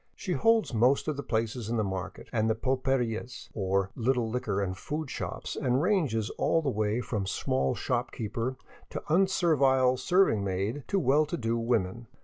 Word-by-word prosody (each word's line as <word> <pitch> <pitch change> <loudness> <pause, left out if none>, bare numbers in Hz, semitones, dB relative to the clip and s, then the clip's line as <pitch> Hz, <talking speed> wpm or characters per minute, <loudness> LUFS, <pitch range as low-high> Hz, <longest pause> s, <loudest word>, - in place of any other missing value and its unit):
She 185 - -3
holds 225 - +3
most 125 +7 +3
of 155 - 0
the 140 - -4
places 115 -2 -2
in 120 - 0
the 110 - +2
market 95 -2 -5
and 110 -1 +2
the 110 - +2
pulperias, 125 -1 -1
or 95 -1 0
little 120 0 +1
liquor 110 -4 -1
and 95 -2 -1
food 150 +6 -4
shops, - - -5
and 125 0 +1
ranges 145 - +1
all 165 - +2
the 140 - +1
way 110 +2 0
from 105 -6 -3
small 65 -7 0
shopkeeper 115 +4 -2 0.3
to - - -5
un 190 +3 +5
servile 135 -8 +3
serving 130 - +3
maid 100 +8 -2
to 200 - 0
well 150 -1 +3
to 170 - -3
do 115 -3 -1
women. 115 -1 -1
120 Hz, 175 wpm, -29 LUFS, 110-140 Hz, 0.3 s, un